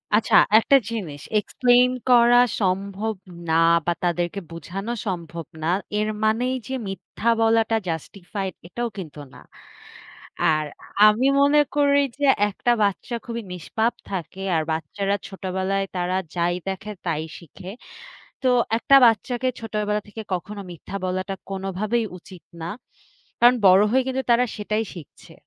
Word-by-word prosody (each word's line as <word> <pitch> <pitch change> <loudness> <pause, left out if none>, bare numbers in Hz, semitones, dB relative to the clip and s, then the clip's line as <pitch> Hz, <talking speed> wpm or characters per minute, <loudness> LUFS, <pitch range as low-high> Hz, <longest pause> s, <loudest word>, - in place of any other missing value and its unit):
আচ্ছা, 220 - +2 0.2
১ 225 - +4
টা 275 - +9
জিনিস 160 -11 -5 0.2
Explain 245 +3 +3 0.2
করা 240 0 +6 0.2
সম্ভব 200 +3 -1 0.3
না - - +2 0.3
বা 175 - +2
তাদেরকে 175 +2 -1
বুঝানো 185 +7 -6 0.2
সম্ভব 170 -3 -4 0.2
না। - - -1 0.3
এর 215 - 0 0.2
মানেই 240 +4 +1
যে 265 - -5
মিথ্যা 205 +3 -3
বলাটা 225 0 +3
Justified 185 +3 -5
এটাও 235 +5 -3
কিন্তু 155 -5 -8
না। - - -13 1.0
আর 155 -1 +2 0.4
আমি 230 +6 +3
মনে 290 +1 +5 0.2
করি 285 -1 +4 0.2
যে, 285 - +1 0.2
১ 195 - -13
টা 240 - +5
বাচ্চা 200 +4 -1
খুবই 235 0 -4
নিষ্পাপ 220 +7 -1 0.2
থাকে, 190 0 -5
আর 160 - +1
বাচ্চারা 195 +6 -2
ছোটবেলায় 195 0 -2
তারা 180 +1 -1 0.2
যাই 175 0 +1
দেখে, 195 +2 -4
তাই 160 -2 -1 0.2
শিখে। 175 +2 -12 0.7
তো 260 - +1 0.3
১ - - -10
টা - - +10
বাচ্চাকে 240 +3 +1
ছোটবেলা 210 -1 -2
থেকে 220 +2 -8
কখনো 200 +3 -4
মিথ্যা 175 +4 -9
বলাটা, 185 +1 -2 0.2
কোনভাবেই 195 +4 -2
উচিত 180 -1 -14 0.2
না। 165 - -4 0.7
কারণ 245 +1 +7
বড় 185 +2 +7
হয়ে 260 0 +3
কিন্তু 265 0 -1
তারা 245 +1 +4
সেটাই 215 +1 -1
শিখছে। 160 -5 -13
200 Hz, 140 wpm, -23 LUFS, 180-230 Hz, 1.0 s, টা